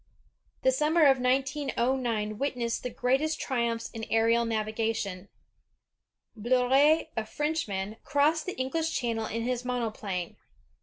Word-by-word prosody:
The 260 - +5
summer 305 +4 +3
of 270 -2 +5
1909 250 -4 0
witnessed 245 -4 -1
the 250 - -3
greatest 270 +6 0
triumphs 235 -3 -1
in 225 -1 -7
aerial 230 +1 +3
navigation. 215 -3 -2 1.1
Bleriot, 260 +8 +3
a 225 - -1
Frenchman, 220 -7 -3
crossed 305 +3 +2
the 370 - -3
EngUsh 315 +6 -1
Channel 230 -3 -1
in 230 +1 -3
his 250 0 -2
monoplane. 215 -8 -3
245 Hz, 115 wpm, -28 LUFS, 225-275 Hz, 1.1 s, The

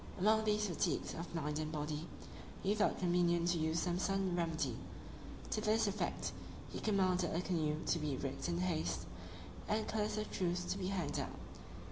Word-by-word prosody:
Among 220 +3 +4
these 210 0 +3
fatigues 175 - 0
of 170 +1 -5
mind 150 -1 -1
and 155 0 -2
body, 150 +1 -2 0.6
he 200 +1 +3
thought 210 0 +2
convenient 175 -1 +3
to 175 -1 +2
use 160 +1 +1
some 175 0 0
sudden 195 -2 +1
remedy: 165 -2 0 0.8
to 215 - +1
this 220 +1 +3
effect, 200 0 -1 0.4
he - - -4
commanded 185 -5 +2
a - - +2
canoe 160 -5 +1
to 170 - +2
be 150 -3 -1
rigged 135 +3 -3
in 170 - 0
haste, 175 -3 0 0.6
and 215 0 +1
colours 215 -1 0
of 215 0 -2
truce 180 -1 0
to 195 - -2
be 185 - -1
hanged 185 -6 -1
out. - - -2
175 Hz, 175 wpm, -37 LUFS, 160-195 Hz, 0.8 s, Among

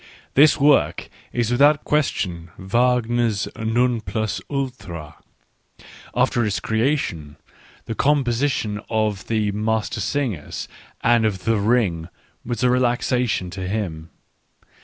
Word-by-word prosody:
This 150 +3 +6
work 145 0 +3 0.2
is 120 -1 0
without 145 +4 +4
question 90 - -1
Wagner's 120 +1 +1
non 115 +1 +1
plus 110 +2 -2
ultra; 110 - -5 1.0
after 120 - +2
its 105 -3 0
creation, 110 - -1 0.5
the 115 - -3
composition 125 -5 +1
of 110 -3 -1
the 110 -2 0
Mastersingers 110 - -2 0.3
and 120 -1 +4
of 100 -4 -1
the 115 -1 +2
Ring 100 -6 +1 0.3
was 120 0 -3
a 125 - +4
relaxation 125 -5 +1
to 95 0 -5
him. 90 -6 -3
110 Hz, 105 wpm, -22 LUFS, 100-125 Hz, 1.0 s, This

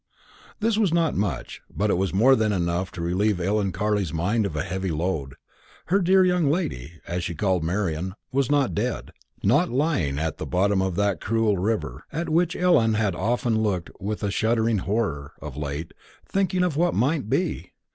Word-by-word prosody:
This 220 0 +1
was 200 -6 +3
not 165 -2 +2
much, 95 -10 -3
but 105 0 0
it - - +2
was 95 +1 0
more 120 +8 +5
than 110 -3 +1
enough 90 -1 -1
to 85 - -6
relieve 95 +3 +1
Ellen 100 +2 0
Carley's 100 -2 0
mind 100 +7 0
of 80 - -7
a 75 - -1
heavy 95 +1 -3
load. 80 -4 -2 0.6
Her 200 - +5
dear 185 0 +4
young 180 -5 +2
lady, 80 - -2
as 85 +1 -2
she 85 - -3
called 95 -4 +1
Marian, 90 0 -2 0.2
was 135 -1 +1
not 145 -3 +2
dead 115 +3 -2 0.3
not 145 - +3
lying 125 - 0
at 80 0 -2
the - - -4
bottom 95 +1 +2
of 95 -2 -1
that 100 -1 0
cruel 115 -1 +1
river, 90 - -2
at 165 +2 -3
which 170 +2 +2
Ellen 120 -12 +3
had 105 -3 +1
often 110 +3 0
looked 95 -5 -1
with 105 +2 -4
a 100 - 0
shuddering 110 0 +1
horror, 90 -8 -2
of 75 -4 -8
late, 75 +2 -5 0.3
thinking 185 -2 0
of 175 -5 0
what 175 +3 +2
might 130 -1 +1
be. 155 - -1
105 Hz, 185 wpm, -25 LUFS, 90-135 Hz, 0.6 s, more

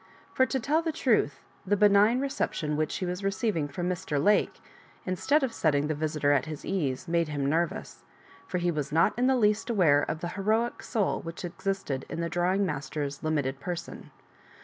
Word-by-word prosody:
For, 260 - +3
to 265 - -1
tell 300 +7 +1
the 325 -1 -1
truth, 220 - +1 0.2
the 205 +2 +1
benign 210 +4 +5
reception 155 - -2
which 155 0 -1
he 185 - -2
was 180 +2 -4
receiving 195 -5 0
from 175 +5 -4
Mr. 180 -4 -2
Lake, 205 +8 +2 0.5
instead 265 - +1
of 260 - -1
setting 145 -3 +1
the 155 - 0
visitor 150 -1 0
at 145 0 +2
his 155 -2 -7
ease, 155 -4 -2
made 170 -1 +1
him 145 -2 -2
nervous; 165 +3 -1 0.5
for - - -2
he 175 0 +1
was 150 -4 -3
not 165 +6 +3
in 245 +2 +2
the 265 -1 +3
least 210 0 +2
aware 165 -10 +4
of 155 +2 -3
the 175 - -3
heroic 215 +5 0
soul 215 -5 -1
which 165 +2 -7
existed 175 -6 -3
in - - -4
the 170 0 -1
drawing 180 +4 +1
master's 145 -2 -4
limited 145 -4 -1
person. 175 +3 -6
175 Hz, 190 wpm, -28 LUFS, 150-210 Hz, 0.5 s, benign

